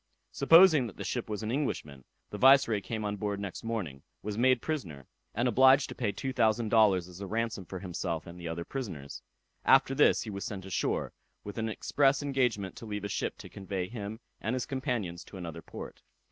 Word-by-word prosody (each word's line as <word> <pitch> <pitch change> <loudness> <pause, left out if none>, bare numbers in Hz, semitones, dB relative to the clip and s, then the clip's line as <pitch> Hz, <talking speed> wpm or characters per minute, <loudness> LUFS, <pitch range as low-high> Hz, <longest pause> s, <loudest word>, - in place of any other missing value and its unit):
Supposing 160 -2 +6
that 100 - -11
the - - -5
ship - - -3
was 105 0 -3
an 110 - -2
Englishman, 75 - -3 0.3
the 105 - -6
Viceroy 130 -5 +6
came 110 +3 -4
on 105 0 -2
board 100 0 -2
next 100 -2 -6
morning, 100 -13 -4 0.2
was 105 0 -3
made 130 +2 +4
prisoner, 90 - -4 0.3
and 120 +4 +1
obliged 130 +3 +5
to - - -5
pay 115 -4 -1
two 130 +6 -4
thousand 110 -2 +2
dollars 100 -6 +4
as 90 +1 -11
a 100 - -4
ransom 110 -2 -2
for 95 - -7
himself 85 -3 -4
and 85 +1 -10
the 85 - -6
other 85 +1 -4
prisoners. 90 - -6 0.4
After 135 - +5
this 145 +2 +4
he 110 - -6
was 100 0 -5
sent 95 -2 -5
ashore, 95 - -1 0.3
with 105 +2 -6
an 110 0 -1
express 135 +5 +2
engagement 125 -9 0
to 115 - -9
leave 105 -1 -4
a 100 - -3
ship - - -2
to - - -10
convey 95 -2 -4
him 110 -1 -6 0.2
and 110 +4 -2
his 130 - -2
companions 120 - -3
to 100 - -11
another 85 -2 -6
port. - - -9
105 Hz, 205 wpm, -30 LUFS, 95-125 Hz, 0.4 s, Supposing